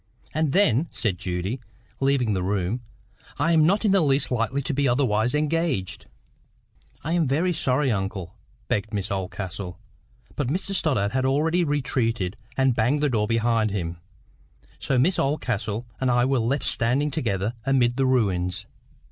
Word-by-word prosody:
"And 155 -2 +1
then," 160 - +3
said 100 -6 -2
Judy, 95 +5 -3 0.4
leaving 135 -5 +2
the 95 - -1
room, 100 +4 -1 0.6
"I 165 +4 +2
am 160 -2 +5
not 200 +5 +2
in 205 - +4
the 195 -1 +4
least 140 -3 +2
likely 125 +3 0
to 140 - -2
be 140 +1 +1
otherwise 120 -1 +2
engaged." 150 - -1 1.0
"I 160 - -1
am 170 -4 +2
very 165 +7 +1
sorry, 135 -2 +1
uncle," 95 -3 -3 0.3
began 105 - -1
Miss 100 0 -2
Oldcastle. 95 -1 -4 0.6
But 145 - -1
Mr 185 +7 -2
Stoddart 130 - +1
had 130 +1 0
already 155 +6 +2
retreated 120 - 0 0.2
and 135 -2 +3
banged 130 +7 +1
the 150 - +3
door 105 -4 +1
behind 115 -1 +2
him. 85 -4 -3 0.8
So 135 - 0
Miss 160 +8 +2
Oldcastle 120 -6 -1
and 130 - +1
I 120 0 +3
were 135 -1 +2
left 125 +5 0
standing 130 +6 +1
together 110 -7 -1
amid 125 -2 +2
the 135 0 +2
ruins. 95 -8 0
125 Hz, 155 wpm, -25 LUFS, 105-145 Hz, 1.0 s, am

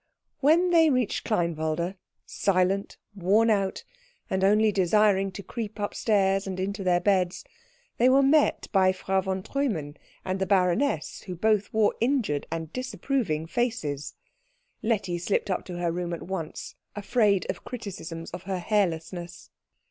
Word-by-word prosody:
When 335 +6 +4
they 325 -2 +6
reached 255 -6 0
Kleinwalde, 170 -3 -1 0.3
silent, 195 +1 0 0.2
wornout, 200 +1 +2 0.5
and 190 0 0
only 210 +2 +4
desiring 195 +1 +3
to 200 - -7
creep 220 -1 -6
upstairs 200 -2 +1
and 185 -1 -4
into 200 +2 -3
their 180 -1 +3
beds, 185 - +1 0.5
they 245 +2 +5
were 270 +1 +5
met 295 +2 +3
by 190 -2 +4
Frau 190 0 0
von 190 0 -3
Treumann 190 - -2 0.3
and 185 0 -2
the 190 - -1
baroness, 180 - +1
who 180 - -4
both 210 +2 +1
wore 220 -1 +3
injured 235 - 0
and 160 -1 -5
disapproving 225 - -2
faces. 165 - -2 0.7
Letty 205 -6 -1
slipped 195 +2 -1
up 185 - -2
to 180 -2 -6
her 175 -1 0
room 175 0 -3
at 170 - -5
once, 170 -4 -5 0.2
afraid 205 -2 +2
of - - -12
criticisms 180 -8 -7
of 180 - -6
her 190 - 0
hairlessness. 175 -3 -2
195 Hz, 140 wpm, -27 LUFS, 175-220 Hz, 0.7 s, they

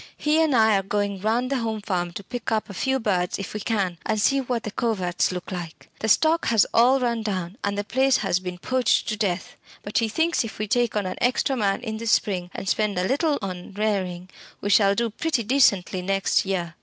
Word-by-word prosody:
He 305 +2 +2
and 310 -5 +2
I 220 -2 +5
are - - +1
going 200 0 -2
round 235 +5 0
the 275 - +1
Home 225 -2 -2
Farm 180 -4 -2
to 200 - -7
pick 240 +4 -5
up 215 -2 -1
a - - -8
few 265 +7 0
birds 185 -6 0
if 195 - -6
we 210 - -3
can, 195 -6 -1
and 215 -1 -1
see 275 +6 +3
what 245 -3 -2
the 215 - -5
coverts 190 -8 0
look 180 +1 -6
like. 175 -3 -7
The 220 - -2
stock 320 +9 +3
has 225 -3 +4
all 250 +4 +5
run 235 -2 0
down, 190 -1 -4
and 200 0 -1
the 205 - -1
place 260 +5 +2
has 185 -3 0
been 180 -1 -6
poached 255 +6 +1
to 215 - -1
death. 195 -4 -2 0.3
But 205 - 0
he 225 -1 0
thinks 325 +7 +1
if 225 - -7
we 215 - -3
take 240 0 +1
on 205 -2 0
an 185 - -4
extra 255 +2 +1
man 205 -2 0
in 220 -3 -4
the 230 +1 -6
spring, 185 -5 +1
and 195 - -5
spend 210 0 0
a 180 +1 +1
little 290 +2 +1
on 185 0 -6
rearing, 185 -3 -2 0.3
we 205 - -2
shall 200 -1 +5
do 235 +1 0
pretty 295 +1 -1
decently 200 -7 +2
next 195 +1 +1
year." 175 -4 -2
210 Hz, 230 wpm, -24 LUFS, 190-240 Hz, 0.3 s, I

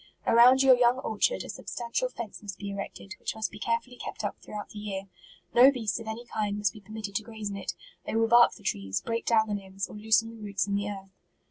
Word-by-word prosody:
Around 250 +3 +7
your 265 -1 +8
young 245 0 +4
orchard, 265 - 0
a - - -10
substantial 245 - -3
fence 235 - -7
must 205 -2 -7
be 200 -1 -5
erected, 200 -1 -6
which - - -3
must 220 0 -2
be 210 - -10
care 230 +1 +1
fully 250 0 -16
kept - - -6
up 205 - -2
throughout 210 -1 -7
the 210 - -9
year. 200 -2 -4 0.5
No 255 +3 +8
beasts 225 -5 -2
of 225 - -9
any 225 +2 -5
kind 210 -3 -2
must 205 -2 +1
be 215 - -12
permitted 210 0 -7
to - - -4
graze 220 -2 -6
in - - -5
it: 195 -2 -4 0.3
they - - -2
will 225 0 +3
bark 240 +1 +7
the 205 - -15
trees, 100 - -1
break 230 0 -3
down 220 -2 +4
the 210 - -2
limbs, 195 -1 -4
or - - -11
loosen 220 +1 +2
the 225 -1 -12
roots 200 -2 -1
in 200 - -3
the 200 +1 0
earth. 195 -1 -8
215 Hz, 250 wpm, -28 LUFS, 200-235 Hz, 0.5 s, your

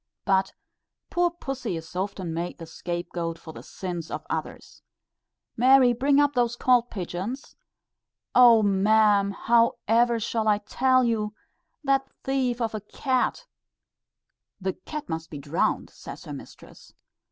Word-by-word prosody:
But 190 -1 +2 0.6
poor 350 0 +2
pussy 270 - -5
is 160 +2 -10
often 185 -2 -3
made 170 +2 -4
the 165 - -8
scape 175 +1 -5
goat 165 -1 -3
for 160 - -11
the - - -10
sins 175 -4 -6
of - - -5
others. - - -5 0.7
"Mary, 255 +1 +6
bring 275 +4 +3
up 290 0 +3
those 240 -2 +1
cold 245 -1 +3
pigeons." 195 +7 -5 0.8
"O 235 -3 +7
ma'am! 205 0 +4
how 230 +3 +3
ever 235 +1 +3
shall 220 0 -1
I 210 -1 +4
tell 255 +5 +2
you? 215 -3 -1 0.5
That 270 -1 +1
thief 260 -3 0
of 225 -1 -1
a 215 - -4
cat 260 - -1 0.6
" - - -59
"The 190 -1 -2
cat 300 -1 -7
must 160 0 -5
be 150 - -7
drowned," 145 +4 -1
says - - -10
her - - -7
mistress. - - -13
220 Hz, 145 wpm, -26 LUFS, 185-250 Hz, 0.8 s, O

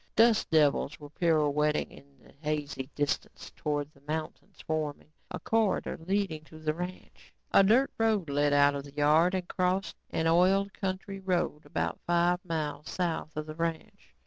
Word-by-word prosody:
Dust 225 0 +4
devils 150 -3 +2
were 145 -1 -11
pirouetting 150 -2 +1
in 140 0 -17
the - - -20
hazy 150 -3 -3
distance 145 -1 -2
towards 150 -1 -2
the 140 - -23
mountains 155 +1 -5
forming 155 -1 -3 0.2
a - - -5
corridor 225 -3 0
leading 190 -6 0
to 160 - -13
the 155 -1 -1
ranch. 180 +3 -8 0.2
A - - +7
dirt 235 +8 +4
road 220 -6 +2
led 145 +1 +2
out 145 0 +5
of 140 -1 -4
the 140 0 -13
yard 155 +5 +4
and 180 -1 -3
crossed 185 +2 -1
an 160 - -1
oiled 190 +4 +3
county 195 +1 -4
road 180 -5 -1
about - - -2
five 175 +1 +2
miles 155 -4 -3
south 165 -4 -2
of 155 - -2
the 155 - -7
ranch. 165 - -5
160 Hz, 165 wpm, -29 LUFS, 150-185 Hz, 0.2 s, A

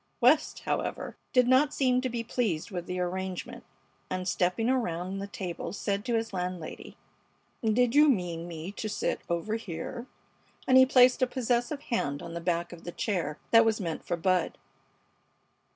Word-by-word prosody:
West, 275 +6 +3
however, - - -3 0.2
did 250 -1 +4
not 260 +3 +4
seem 255 -2 +2
to 255 - -1
be 235 -1 -3
pleased 225 -7 -1
with 175 -2 -5
the 180 0 -3
arrangement, 185 +1 -4 0.5
and, 185 0 -3
stepping 180 +5 +1
around 195 -7 -1
the 200 - -4
table, 180 -4 -5
said 200 +1 -2
to 240 0 0
his 225 -2 -2
landlady: 180 -3 -5 0.7
"Did 230 +2 +3
you 300 +1 +7
mean 175 -8 -1
me 165 +2 -6
to 215 +1 -5
sit - - -1
over 170 +6 -1
here?" 225 +5 -6 0.6
and 260 - +5
he 260 0 +8
placed 255 0 +5
a 255 - +4
possessive 245 +3 -1
hand 145 -10 -1
on 170 - -7
the 170 - -4
back 170 0 -1
of 170 - -12
the 175 - -5
chair 170 -7 -2
that 230 0 +8
was 225 -1 +1
meant 165 -5 -4
for 175 - -2
Bud. 180 0 +1
200 Hz, 170 wpm, -29 LUFS, 175-245 Hz, 0.7 s, he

